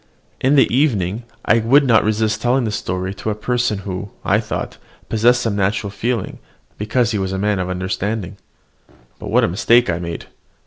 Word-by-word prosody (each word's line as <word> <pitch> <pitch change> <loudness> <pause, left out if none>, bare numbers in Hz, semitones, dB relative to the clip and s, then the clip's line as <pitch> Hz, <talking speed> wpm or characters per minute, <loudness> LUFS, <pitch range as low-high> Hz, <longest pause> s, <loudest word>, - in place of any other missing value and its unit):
In 135 +3 +3
the 135 - +6
evening 115 - +1 0.2
I 115 - +4
would 135 +6 +4
not 115 -4 +4
resist 110 0 0
telling 125 +2 +2
the 110 - -1
story 95 -1 -3
to 100 +2 -5
a 105 - -1
person 120 0 0
who, 95 0 -5 0.2
I - - +3
thought, - - -5 0.3
possessed 120 +3 +3
some 115 -3 -1
natural 100 +1 0
feeling, 115 0 -3 0.4
because 115 +2 0
he 105 - -1
was 95 -1 -2
a 95 - -2
man 105 0 0
of 90 0 -2
understanding. 95 +2 -3 0.8
But - - -7
what - - +3
a - - +3
mistake 115 +5 +3
I 85 - -2
made. 85 -1 -5
105 Hz, 185 wpm, -19 LUFS, 95-120 Hz, 0.8 s, the